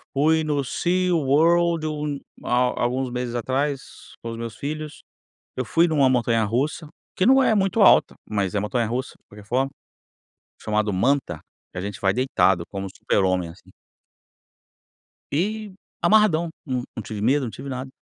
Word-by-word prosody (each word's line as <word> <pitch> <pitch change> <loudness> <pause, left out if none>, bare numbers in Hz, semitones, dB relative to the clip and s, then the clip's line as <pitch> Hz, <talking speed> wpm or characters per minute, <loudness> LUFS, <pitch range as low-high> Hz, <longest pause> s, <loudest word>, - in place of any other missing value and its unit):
Fui 160 +3 +3
no 145 -2 0
Sea 180 +6 0
World 165 +3 +3
um 150 -2 -3 0.2
há 125 +1 +2
há - - -4
alguns 125 +1 -1
meses 125 -1 -3
atrás, 135 +3 -3
com 115 - -4
os 115 - -6
meus 115 -2 -6
filhos, 150 +3 -6 0.5
eu 130 - -1
fui 165 +8 +3
em - - -3
uma 140 -4 +4
montanha 115 -3 +2
russa, 140 +8 -1 0.3
que 185 - +1
não 265 +3 +6
é 225 - +3
muito 195 +2 +1
alta, - - +6 0.2
mas 100 -3 -1
é 105 - +1
montanha 115 +3 -1
russa 125 +4 -3
de - - -45
qualquer 105 0 -14
forma, 135 +4 0 0.9
chamado 105 -1 0
Manta, 110 - +1 0.3
que - - -11
a - - -4
gente 100 0 -5
vai 95 0 +2
deitado 95 -8 +2
como 95 -1 -5
o - - -6
Super 100 - +1
Homem, 90 -2 0
assim. 85 - -16 1.6
E 210 +6 -1 0.3
amarradão, 185 -6 +4 0.2
não 125 -3 -2
não 115 - -4
tive 105 -1 -6
medo, 135 +5 +2
não 115 - -5
tive 140 - -8
nada. 130 0 -5
130 Hz, 175 wpm, -23 LUFS, 110-155 Hz, 1.6 s, não